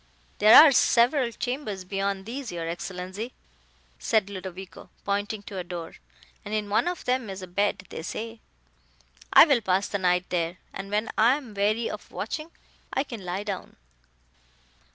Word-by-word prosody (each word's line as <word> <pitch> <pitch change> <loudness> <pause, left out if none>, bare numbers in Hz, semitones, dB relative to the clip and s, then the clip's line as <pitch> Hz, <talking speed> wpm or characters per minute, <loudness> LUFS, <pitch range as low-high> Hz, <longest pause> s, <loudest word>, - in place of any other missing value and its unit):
"There 215 +2 +8
are 310 -2 +9
several 245 0 +3
chambers 240 -5 -4
beyond 195 +1 -2
these, 255 +3 -5
your 170 -1 -4
Excellenza," 185 +5 -5 0.7
said 210 -3 +1
Ludovico, 190 -1 -8 0.2
pointing 205 +1 -2
to 195 -2 -6
a - - -3
door, 175 -2 -7 0.5
"and 210 - -4
in 210 -1 -2
one 215 - +2
of 355 -1 -3
them 250 -3 0
is 190 -1 -6
a - - -4
bed, 200 +2 -1
they - - -6
say. 225 +6 -6 0.9
I - - +10
will 280 -7 +3
pass 190 -1 +1
the 200 - -2
night 180 -1 +2
there, 170 0 -1 0.2
and 195 0 -6
when 210 +2 -1
I 235 +4 +6
am 255 -7 -10
weary 210 +3 +1
of - - -7
watching, 310 +1 -5 0.4
I 270 - 0
can 235 -8 -8
lie 180 +3 -3
down." 200 -3 -6
205 Hz, 165 wpm, -26 LUFS, 185-230 Hz, 0.9 s, I